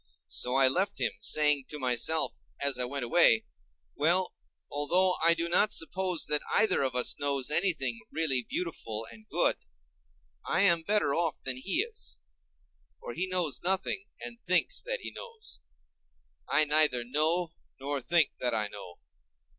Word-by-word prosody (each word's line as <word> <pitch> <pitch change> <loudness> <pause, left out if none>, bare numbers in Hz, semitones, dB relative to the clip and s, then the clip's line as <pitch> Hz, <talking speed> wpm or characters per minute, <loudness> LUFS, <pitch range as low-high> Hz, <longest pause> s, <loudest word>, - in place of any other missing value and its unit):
So 125 +1 -1
I 135 -1 +5
left 190 +9 -1
him, - - 0
saying 150 -3 +2
to 150 - -7
myself, 130 +4 +1 0.3
as 140 -2 0
I 125 - +2
went 135 0 -4
away: 115 -4 +5 0.5
Well, 175 +5 +2 0.4
although 180 +6 +2
I 170 0 +7
do 165 0 -2
not 180 +5 +3
suppose 180 +1 -2
that 150 0 0
either 215 -4 +3
of 130 -2 -2
us 125 - +1
knows 140 -1 -1
anything 150 -9 +2
really 150 -6 0
beautiful 115 -7 -4
and 110 -1 -16
good, - - +1 0.9
I - - 0
am 170 -4 +4
better 205 -4 0
off 165 -2 -2
than 130 -1 -2
he 195 - -1
is—for 470 +1 -12
he 185 - -3
knows 175 -8 -1
nothing, 190 +1 -1
and 235 -1 -9
thinks - - +2
that - - -5
he - - -7
knows. 465 -3 -11 0.9
I 155 +1 +4
neither 150 -5 +4
know 160 +7 0 0.3
nor 140 +1 -3
think 160 +4 +2
that 125 - -1
I 105 -1 -1
know. 95 -4 -11
155 Hz, 155 wpm, -28 LUFS, 130-180 Hz, 0.9 s, I